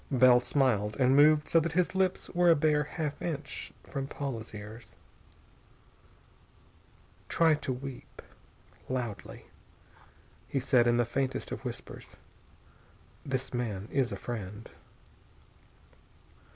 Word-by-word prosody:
Bell 130 -2 +6
smiled, 120 -6 +1
and 130 0 +4
moved 150 +1 +6
so 165 - +4
that 165 0 -2
his 180 +1 +1
lips 190 -1 0
were 175 0 +4
a 165 - +7
bare 150 0 +2
half 150 -1 -4
inch 155 -4 -4
from 135 -2 -5
Paula's 135 -6 -5
ears. 105 +2 -10 2.3
"Try 165 -1 +4
to 150 -3 -2
weep, 130 0 -8 0.7
loudly," 120 -6 -4 1.0
he 135 - -1
said 125 -2 +3
in 120 0 +3
the 120 - +3
faintest 130 +3 -2
of - - -5
whispers. - - -8 1.1
"This 135 -2 -3
man 110 -5 -3
is 135 -3 +1
a - - -2
friend." 105 -2 -6
135 Hz, 115 wpm, -30 LUFS, 120-150 Hz, 2.3 s, a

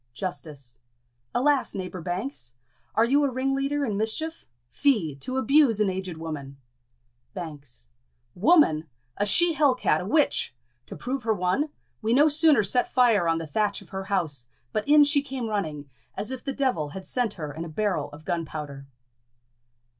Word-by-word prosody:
Justice. 145 -8 -6 0.6
Alas, 280 +1 +2
neighbour 185 -2 -5
Banks! 175 - -4 0.4
are 225 - +5
you 280 +5 +3
a 280 - +2
ringleader 270 +2 0
in 210 -5 -2
mischief? 315 +10 -3 0.2
Fie! 210 - +1
to 255 - -4
abuse 265 -4 +4
an 205 -3 +2
aged 185 -3 -5
woman! 145 -4 -6 0.8
Banks. 145 - -8 0.5
Woman! 180 - +4 0.3
a 205 - +1
she 345 - +4
hell 290 -4 +3
cat, 155 -10 +1
a - - -5
witch! 295 - +1 0.3
To - - -8
prove 260 +2 -3
her 220 -1 +1
one, 185 - 0 0.3
we 225 +2 +2
no 295 +3 +6
sooner 295 -6 +5
set 245 +6 +1
fire 230 -8 +4
on 165 0 +2
the 165 - -4
thatch 205 +6 -1
of 175 - -21
her 190 0 -5
house, 160 -11 -1 0.3
but 215 - -1
in 295 0 +7
she 285 0 +3
came 265 -3 -5
running, 155 -9 -3 0.3
as 205 +5 -4
if 260 - -5
the 275 - -2
devil 255 - 0
had 190 +6 -8
sent 245 -5 -1
her 150 -3 -6
in 160 +3 -5
a 170 - -7
barrel 170 -3 -1
of 155 +1 -13
gunpowder. 150 -4 -4
205 Hz, 170 wpm, -26 LUFS, 160-270 Hz, 0.8 s, in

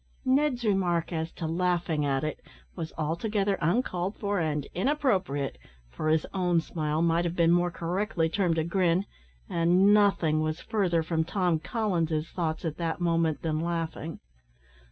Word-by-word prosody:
'" - - -34
Ned's 260 -2 +2
remark 180 -5 +1
as 160 0 -2
to 165 - -5
"laughing 170 -2 0
at 135 0 0
it," 155 -1 -3 0.4
was 160 - -5
altogether 195 +6 0
uncalled 180 +1 0
for 205 -2 -1
and 150 -3 -1
inappropriate, 190 - 0 0.3
for 155 - -2
his 155 0 +2
own 180 -3 +2
smile 155 -1 -1
might 170 0 +2
have 170 0 -2
been 170 -1 +4
more 175 0 +3
correctly 175 +1 -1
termed 170 -1 0
a 160 - +2
grin, 175 +2 +1 0.4
and 180 +4 +4
nothing 185 -7 +3
was 155 +1 -1
further 180 -6 0
from 160 0 0
Tom 175 -2 0
Collins's 165 -7 -1
thoughts 165 -1 -2
at 155 -2 -3
that 165 -1 -2
moment 165 -3 +1
than 155 -2 0
laughing. 165 -1 -3
170 Hz, 155 wpm, -28 LUFS, 160-190 Hz, 0.4 s, been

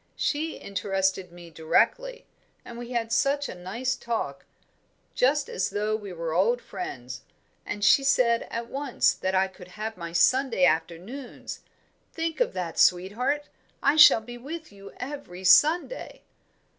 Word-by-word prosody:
She 315 +2 -2
interested 190 -2 -2
me 175 -1 -13
directly, 485 - 0 0.4
and 235 - -9
we 240 0 -7
had 235 -2 -2
such 280 +3 +1
a - - -6
nice 225 +9 -3
talk, 220 -13 -4 0.7
just 280 +3 +2
as 185 - -2
though 210 +1 -1
we 205 -3 -7
were 165 -2 -4
old 215 +8 +2
friends; 130 - -7 0.5
and 205 0 -4
she 195 +8 +6
said 245 -4 +2
at 230 0 -4
once 275 -1 +1
that 190 0 -2
I 190 +1 +3
could 190 -1 -14
have 215 +3 -6
my 170 -1 -6
Sunday 245 +2 +3
afternoons 180 - -3 0.5
think 330 -1 -3
of - - +1
that, 175 -3 -4
sweetheart! 240 +11 +2 0.4
I 280 - +4
shall 300 -7 +8
be 240 +2 -10
with 315 +5 -8
you 200 0 -12
every 250 -9 -7
Sunday." 310 - +3
220 Hz, 145 wpm, -26 LUFS, 185-275 Hz, 0.7 s, shall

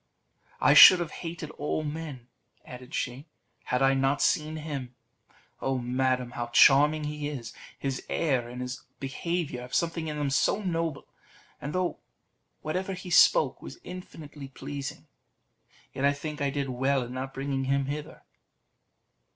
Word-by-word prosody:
"I - - +5
should 185 - +11
have 170 -3 -3
hated 165 -3 -6
all 150 +2 -1
men," 150 -5 -6 0.4
added 125 0 -9
she, 130 +5 -3 0.4
"had 125 +1 +1
I 135 0 +5
not 135 +1 +1
seen 155 +2 +1
him! 140 -5 -6 0.7
Oh, 135 0 0
madam, 125 0 0
how 120 -1 -4
charming 145 +5 +5
he 150 0 -3
is! 120 -6 -7 0.2
His 135 -2 -3
air 130 -7 0
and 125 +1 -7
all - - -2
his 125 0 -6 0.2
behaviour 145 0 -3
have 125 0 -6
something 165 -1 0
in 150 -1 -4
them 145 -2 -1
so 150 - +2
noble; 165 -5 -2 0.6
and 145 - -4
though 185 0 -1 0.6
whatever 185 +5 -2
he 180 -1 -8
spoke - - +5
was - - -9
infinitely 155 -6 -9
pleasing, 140 +1 -7 0.9
yet 135 - -4
I 140 0 +4
think 150 +1 -6
I 140 - +1
did 140 -1 -2
well 135 +1 +1
in 120 +1 -8
not 130 +1 -4
bringing 135 0 -2
him 140 +1 +1
hither." 145 +2 -6
140 Hz, 155 wpm, -28 LUFS, 130-155 Hz, 0.9 s, should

